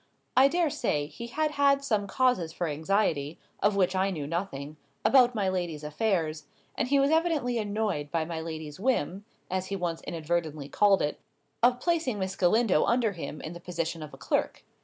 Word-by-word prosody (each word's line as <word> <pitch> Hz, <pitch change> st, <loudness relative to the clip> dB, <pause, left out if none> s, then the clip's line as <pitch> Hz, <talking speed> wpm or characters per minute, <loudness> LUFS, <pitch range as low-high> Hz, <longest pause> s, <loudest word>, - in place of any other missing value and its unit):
I 265 Hz, +2 st, +7 dB
dare 335 Hz, +1 st, +1 dB
say, 150 Hz, -, 0 dB
he 235 Hz, +10 st, -8 dB
had 305 Hz, +5 st, 0 dB
had 280 Hz, -1 st, +3 dB
some 215 Hz, -6 st, 0 dB
causes 200 Hz, -8 st, +1 dB
for 175 Hz, -, -3 dB
anxiety 155 Hz, -1 st, 0 dB, 0.2 s
(of 205 Hz, 0 st, +3 dB
which 190 Hz, -1 st, +2 dB
I 190 Hz, +1 st, +2 dB
knew 155 Hz, -7 st, -4 dB
nothing) 155 Hz, -3 st, -4 dB, 0.3 s
about 250 Hz, -2 st, +5 dB
my 200 Hz, -3 st, 0 dB
lady's 175 Hz, -5 st, -2 dB
affairs; 155 Hz, -1 st, -1 dB, 0.3 s
and -, -, 0 dB
he 280 Hz, +2 st, +3 dB
was 275 Hz, +2 st, +3 dB
evidently 315 Hz, -8 st, +1 dB
annoyed 205 Hz, -8 st, -2 dB
by 165 Hz, 0 st, 0 dB
my 165 Hz, -1 st, -4 dB
lady's 160 Hz, -2 st, -6 dB
whim 200 Hz, -, 0 dB, 0.3 s
(as 185 Hz, 0 st, -1 dB
he 200 Hz, -, -3 dB
once 175 Hz, -3 st, -2 dB
inadvertently 160 Hz, -3 st, -3 dB
called 200 Hz, +4 st, +4 dB
it) 145 Hz, -, -2 dB, 0.4 s
of 245 Hz, +1 st, +4 dB
placing 320 Hz, -7 st, 0 dB
Miss 190 Hz, -1 st, -3 dB
Galindo 195 Hz, -2 st, +3 dB
under 235 Hz, -2 st, +2 dB
him 165 Hz, -4 st, -6 dB
in 155 Hz, -, -6 dB
the 175 Hz, -, -9 dB
position 170 Hz, -2 st, -3 dB
of 155 Hz, -, -7 dB
a 135 Hz, -, -12 dB
clerk. 125 Hz, -, -1 dB
190 Hz, 185 wpm, -28 LUFS, 160-240 Hz, 0.4 s, I